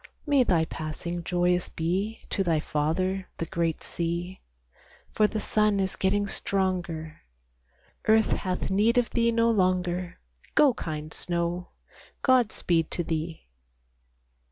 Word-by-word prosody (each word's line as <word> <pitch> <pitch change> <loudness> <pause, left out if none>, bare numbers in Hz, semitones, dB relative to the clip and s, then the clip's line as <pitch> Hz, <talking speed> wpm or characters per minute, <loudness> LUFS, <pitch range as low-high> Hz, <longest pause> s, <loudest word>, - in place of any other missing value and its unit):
May 285 -4 +4
thy 170 -8 +2
passing 165 +2 -5
joyous 180 0 +1
be 190 +7 -2
To 195 - +1
thy 165 -4 +2
father, 185 +6 -1
the 165 - -2
great 165 -1 -1
sea, 170 +2 -3 0.7
For 215 - +3
the 215 - -3
sun 210 -1 +2
is 190 -1 -1
getting 205 +2 +1
stronger; 180 -6 -2 0.9
Earth 220 0 +4
hath 185 0 -1
need 215 +5 +3
of 245 -1 +2
thee 235 -1 +2
no 230 0 +3
longer; 180 -3 0 0.4
Go, 290 -4 +6
kind 155 -5 -5
snow, 175 +1 -1 0.6
God 255 -4 +4
speed 165 -2 0
to 175 - -2
thee! 160 0 -4
180 Hz, 130 wpm, -27 LUFS, 170-210 Hz, 0.9 s, Go